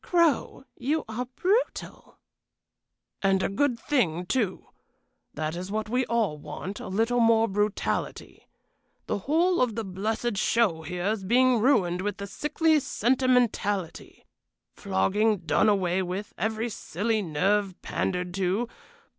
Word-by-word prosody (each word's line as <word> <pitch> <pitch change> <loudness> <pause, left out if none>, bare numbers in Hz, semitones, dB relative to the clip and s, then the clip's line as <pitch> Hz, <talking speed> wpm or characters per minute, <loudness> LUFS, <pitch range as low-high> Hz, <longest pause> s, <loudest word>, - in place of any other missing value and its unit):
"Crow, 335 -6 +1
you 295 +5 -1
are 235 +3 -4
brutal." 415 +7 -1 1.0
"And 195 -1 +2
a - - +1
good 245 +3 0
thing, 180 - 0
too. 195 -1 -1 0.7
That 155 +1 -3
is 180 +2 -5
what 215 0 -2
we 250 +2 0
all 220 -10 0
want, 170 +7 -7
a - - -7
little 225 +5 +1
more 230 -1 +4
brutality. 205 +1 -2 0.6
The - - -2
whole 335 - +2
of 240 -4 +1
the 225 - -2
blessed 215 +4 -2
show 205 -6 +2
here 175 +3 -4
is 210 -1 0
being 250 +4 +4
ruined 185 -8 +2
with 205 +1 -3
this 200 0 -7
sickly 310 +1 +2
sentimentality. 240 - 0 0.5
Flogging 205 - +1
done 185 +7 +3
away 190 -2 +1
with; 185 +3 -4
every 220 +4 -2
silly 215 +2 -2
nerve 190 +3 0
pandered 180 -1 -2
to. 195 +5 0
210 Hz, 130 wpm, -27 LUFS, 185-245 Hz, 1.0 s, more